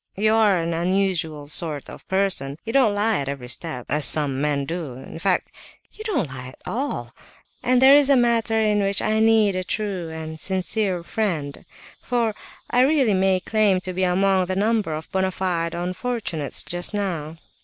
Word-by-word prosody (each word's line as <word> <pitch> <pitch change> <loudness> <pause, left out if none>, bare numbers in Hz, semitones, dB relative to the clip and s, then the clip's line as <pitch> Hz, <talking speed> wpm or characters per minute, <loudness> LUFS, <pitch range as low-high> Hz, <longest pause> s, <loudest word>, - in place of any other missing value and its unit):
You 215 +2 +3
are 215 -4 +4
an 165 0 -1
unusual 170 -4 -1
sort 150 -1 -1
of - - -10
a - - -32
person; 190 -8 0
you 225 - -4
don't 245 -7 +4
lie 210 -1 +1
at 140 -1 -3
every 135 -3 -5
step, 125 -1 -4
as 150 0 +1
some 135 +1 +2
men 145 -2 0
do; 165 -4 -4
in 130 +5 -10
fact, 185 +1 0 0.4
you 435 - -9
don't 300 - 0
lie 130 -1 -8
at 130 - -13
all, 275 +5 -3 0.5
and 250 0 +3
there 265 +2 +8
is 285 -1 +5
a 275 - +6
matter 230 -2 +2
in 210 -1 +2
which 195 0 0
I 215 0 +1
need 220 -3 +4
a 185 - -1
true 190 -4 -3
and 160 0 -7
sincere 190 +1 -1
friend, 170 -9 -3 0.4
for 235 -3 0 0.4
I 245 - +4
really 265 -5 +3
may 190 -1 +2
claim 210 -3 +2
to 185 0 -5
be 185 +1 -1
among 185 0 +2
the 185 - -2
number 205 -5 +1
of 155 - -8
bona 190 0 +1
fide 175 -3 -2
unfortunates 180 - -2
just 175 +4 -2
now." 165 -6 -3
190 Hz, 185 wpm, -23 LUFS, 160-215 Hz, 0.5 s, there